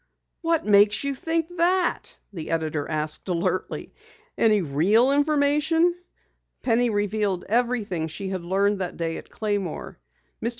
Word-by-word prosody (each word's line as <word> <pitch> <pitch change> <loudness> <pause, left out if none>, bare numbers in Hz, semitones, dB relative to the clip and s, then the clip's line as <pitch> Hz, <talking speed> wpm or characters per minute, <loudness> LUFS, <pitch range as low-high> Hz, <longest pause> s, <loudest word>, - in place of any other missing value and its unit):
"What 330 -1 +1
makes 205 +2 +4
you 280 0 -1
think 330 +5 -2
that?" 355 +1 +1 0.2
the 160 -4 -6
editor 155 -3 -2
asked 155 +3 -3
alertly. 180 +1 -2 0.4
"Any 215 -2 +3
real 195 - +3
information?" 300 +3 +2 0.7
Penny 240 0 +2
revealed 205 -3 -1
everything 220 -7 0
she 190 +5 -6
had 190 -2 -3
learned 200 +3 +1
that 180 - -4
day 165 -1 -2
at - - -11
Claymore. 205 - -3 0.4
Mr. 230 - 0
210 Hz, 130 wpm, -24 LUFS, 180-280 Hz, 0.7 s, makes